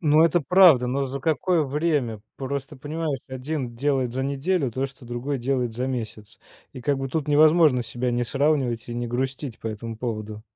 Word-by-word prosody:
Ну, 155 -1 +5
это 170 +1 +3
правда. 165 -5 +6
Но 135 +3 0
за 135 +1 -5
какое 160 +3 +1
время? 140 -6 -1 0.2
Просто 140 +1 -4
понимаешь, 150 +1 -3
1 130 -1 -4
делает 130 -1 0
за 130 - -2
неделю 140 +2 0
то, 130 +4 -2
что 135 -1 -15
другой 120 +4 -3
делает 125 -1 -1
за 125 +2 -2
месяц. 110 -5 -5 0.3
И 130 - -8
как 140 +2 0
бы 135 0 -3
тут 150 +2 -2
невозможно 155 -3 +5
себя 120 +2 -3
не 120 0 0
сравнивать 135 -4 0
и 120 - -4
не 120 0 -2
грустить 130 +1 -3
по - - -7
этому 110 +1 -5
поводу. 110 -2 -5
135 Hz, 190 wpm, -24 LUFS, 120-145 Hz, 0.3 s, правда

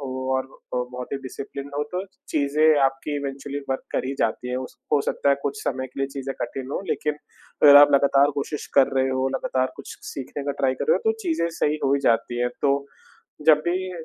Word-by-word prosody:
हो 130 -1 -4
और 130 - 0
अ, 135 -1 -10
बहुत 125 +1 -7
ही - - 0
डिसिप्लिनड 140 +2 -7
हो 145 - +1
तो 185 +2 -2 0.2
चीज़ें 150 +1 +3
आपकी 135 +2 -1
इवेंचुअली 140 0 -4
वर्क 130 - -1
कर - - 0
ही 135 - -3
जाती 120 +2 -1
हैं। 125 - -2
उस 130 0 -6 0.2
हो 145 - +5
सकता 140 - -1
है 140 - +6
कुछ 140 - -3
समय 130 0 -2
के 130 +2 -9
लिए 135 - +1
चीज़ें 135 -1 -5
कठिन 135 0 -5
हों - - -2
लेकिन 150 -1 -1 0.5
अगर 145 -1 +10
आप 145 0 +8
लगातार 140 +1 +4
कोशिश 145 +1 -4
कर 135 -2 +6
रहे 130 0 +3
हो, 130 0 0
लगातार 130 -1 -1
कुछ - - -9
स - - -32
सीखने 140 +1 -6
का 140 - -1
ट्राई 130 -1 +2
कर - - -3
रहे 480 - +6
हो 445 -1 +1
तो - - +2
चीज़ें 320 - 0
सही 155 -1 0
हो 135 - +3
ही 140 - 0
जाती 120 0 +1
हैं। 125 - +2
तो 140 0 +2 0.6
जब 155 -1 +8
भी 185 +1 -1
140 Hz, 230 wpm, -24 LUFS, 130-145 Hz, 0.6 s, अगर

